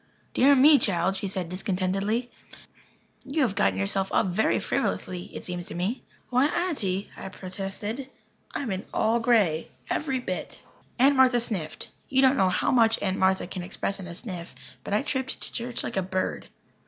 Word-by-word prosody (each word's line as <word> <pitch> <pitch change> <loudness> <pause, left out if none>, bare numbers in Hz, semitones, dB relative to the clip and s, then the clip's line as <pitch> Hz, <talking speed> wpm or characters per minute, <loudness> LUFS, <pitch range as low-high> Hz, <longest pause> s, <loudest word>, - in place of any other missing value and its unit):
"Dear 280 +2 +6
me, 285 +2 +7
child," 185 -1 +1
she 195 +1 -3
said 185 -2 -3
discontentedly, 195 +5 -1 0.9
"you 280 +2 0
have 225 -7 +1
gotten 95 - +2
yourself 190 - 0
up - - +3
very 185 +5 +2
frivolously, 180 0 -2
it - - -9
seems 175 -1 -5
to - - -7
me." 190 +9 -2 0.3
"Why, 255 +3 +4
Aunty," 230 - -1
I - - -7
protested, 195 +7 -5 0.5
"I'm 200 -9 -2
all 225 +2 +3
in - - -2
grey 205 -10 +3 0.2
every 270 -4 0
bit." 185 -7 -5 0.3
Aunt 275 +3 +5
Martha 255 -2 +5
sniffed. 190 -10 -2 0.2
You 265 0 +3
don't 265 +1 +6
know 190 -5 +3
how - - +1
much 230 -2 +4
Aunt 190 -1 0 0.3
can 185 - -4
express 195 +2 -3
in 185 - -7
a 170 - -7
sniff. 180 - -7 0.3
But 200 - -1
I 215 - +1
tripped 265 -3 -2
to - - -3
church 240 0 -3
like - - -4
a - - +3
bird. 185 0 -2
200 Hz, 175 wpm, -26 LUFS, 185-255 Hz, 0.9 s, me